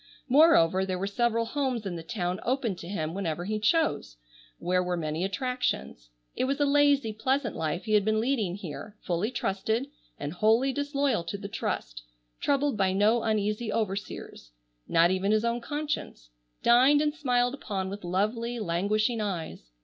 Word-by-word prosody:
Moreover 245 - +5
there 185 -1 -2
were 190 - -2
several 230 +3 +1
homes 250 -3 -2
in 185 -3 -3
the 165 - -5
town 180 +1 -3
open 245 -5 -1
to 170 - -9
him 165 -5 -3
whenever 175 -3 -3
he 215 +2 -2
chose, 215 - +1 0.4
where 180 +1 +1
were 180 -1 -1
many 155 +1 -2
attractions. 225 - -2 0.3
It - - 0
was 275 +2 -1
a 290 - +3
lazy 285 -5 +3
pleasant 260 +3 -1
life 165 +3 -2
he 215 - -2
had 210 -1 +5
been 215 +1 +1
leading 220 -7 0
here, 200 +3 -8
fully 175 +5 -1
trusted, 225 +3 -2 0.3
and 145 +2 -4
wholly 225 +8 +3
disloyal 285 - 0
to 200 - -4
the 200 0 -6
trust, - - -4 0.4
troubled 280 -3 +1
by 190 -1 +2
no 215 +4 +3
uneasy 215 +1 -1
overseers, 200 - -4 0.4
not 170 +2 +4
even 190 +2 +1
his 215 +1 +2
own 235 +1 0
conscience, 290 - -4 0.3
dined 260 +5 +6
and 300 0 +1
smiled 250 -5 +1
upon 200 -8 -4
with 200 0 -7
lovely 215 +7 -1
languishing 215 +4 0
eyes. 165 - -4
215 Hz, 165 wpm, -28 LUFS, 185-250 Hz, 0.4 s, dined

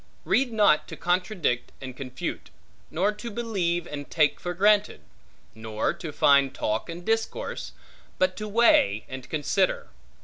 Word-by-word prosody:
Read 260 -1 +2
not 205 -8 +3
to - - -8
contradict 180 - -1
and 130 -2 -8
confute; 130 -1 -6 0.4
nor 195 +6 +1
to 210 +3 -7
believe 195 -7 -1
and 145 -3 -7
take 150 -3 +2
for 175 0 -4
granted; 205 - +3 0.5
nor 110 -1 -2
to 165 -4 -7
find 140 -2 +4
talk 110 +8 -2
and 175 +1 -7
discourse; 225 0 -2 0.4
but 185 0 +1
to 215 - -5
weigh 200 - +4
and 130 -1 -8
consider. 160 +5 0
175 Hz, 140 wpm, -26 LUFS, 135-210 Hz, 0.5 s, find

